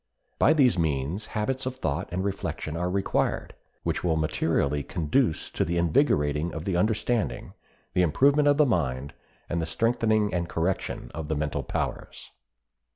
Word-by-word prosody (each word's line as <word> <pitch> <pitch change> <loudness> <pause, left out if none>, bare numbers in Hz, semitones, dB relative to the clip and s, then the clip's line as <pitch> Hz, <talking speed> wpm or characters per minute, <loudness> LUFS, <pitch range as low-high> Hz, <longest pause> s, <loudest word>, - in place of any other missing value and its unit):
By 155 - +6
these 130 - +4
means 80 +6 -1
habits 130 +5 -1
of 130 - -3
thought 75 - -2
and 90 +2 -1
reflection 95 -5 -3
are 90 +2 -1
required, 95 +1 -1 0.3
which - - -1
will 85 -3 +2
materially 75 -2 0
conduce 85 - 0
to - - 0
the 85 +1 -1
invigorating 80 - +2
of 80 +2 -5
the 95 - 0
understanding, 110 +4 0 0.4
the 90 - +3
improvement 140 - +4
of 145 0 +4
the 150 - +5
mind, 70 - -1 0.3
and 85 -1 -1
the 80 - -2
strengthening 110 +3 +1
and 85 -1 -1
correction 85 +3 -2
of 80 -1 -5
the 80 - -1
mental 75 0 -1
powers. - - -4
85 Hz, 155 wpm, -27 LUFS, 80-110 Hz, 0.4 s, By